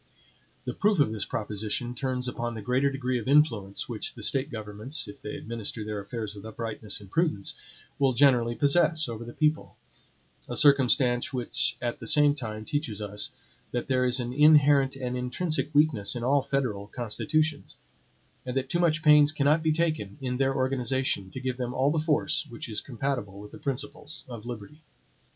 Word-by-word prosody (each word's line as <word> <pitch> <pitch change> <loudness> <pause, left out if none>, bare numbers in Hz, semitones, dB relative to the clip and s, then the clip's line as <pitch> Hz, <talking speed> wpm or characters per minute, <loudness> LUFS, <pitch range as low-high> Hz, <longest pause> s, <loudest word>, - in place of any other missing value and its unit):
The - - -3
proof 210 -1 +2
of 140 -7 +3
this 110 -3 -3
proposition 110 +3 -3
turns 125 0 -2
upon 120 -1 -3
the 110 - -5
greater 130 +5 +2
degree 130 -2 -1
of 115 - -7
influence 115 -9 +2
which 115 -3 -5
the 115 - -7
State 135 +6 0
governments 110 +5 -4
if 100 - -11
they 105 - -6
administer 110 -1 -5
their 105 -1 -3
affairs 105 +1 -5
with 100 - -11
uprightness 110 -1 -4
and 100 -2 -14
prudence, 155 - 0 0.5
will 135 -2 +3
generally 120 -3 +4
possess 155 +4 +3
over 115 -1 -5
the 120 - -8
people; 155 +4 0 0.7
a - - -2
circumstance 130 -3 +4
which 125 -2 0
at 120 -1 -2
the - - -7
same 145 -1 +5
time 110 -6 -6
teaches 135 -8 -2
us 105 0 -3 0.4
that 120 +1 -2
there 130 -1 +2
is 125 +1 +3
an 120 0 -3
inherent 145 -2 +5
and 125 -2 -3
intrinsic 150 +6 -1
weakness 140 -9 +3
in 120 - -4
all 140 +3 +3
federal 130 -7 -2
constitutions; 145 +7 -2 0.7
and 125 0 -3
that 135 0 -1
too 175 - 0
much 155 -3 +2
pains 150 -1 +7
cannot 150 +1 +2
be 160 0 +2
taken 155 -11 -1
in 125 -2 -2
their 135 0 +1
organization, 130 -5 -1
to 130 - -7
give 130 -1 -3
them 125 -1 -3
all 135 +2 +3
the 160 - +1
force 155 0 0
which 120 0 -7
is 110 -2 -3
compatible 125 -6 -3
with 105 0 -10
the - - -11
principles 145 +3 -5
of 120 -2 -8
liberty. 120 +6 -8
125 Hz, 180 wpm, -27 LUFS, 115-145 Hz, 0.7 s, pains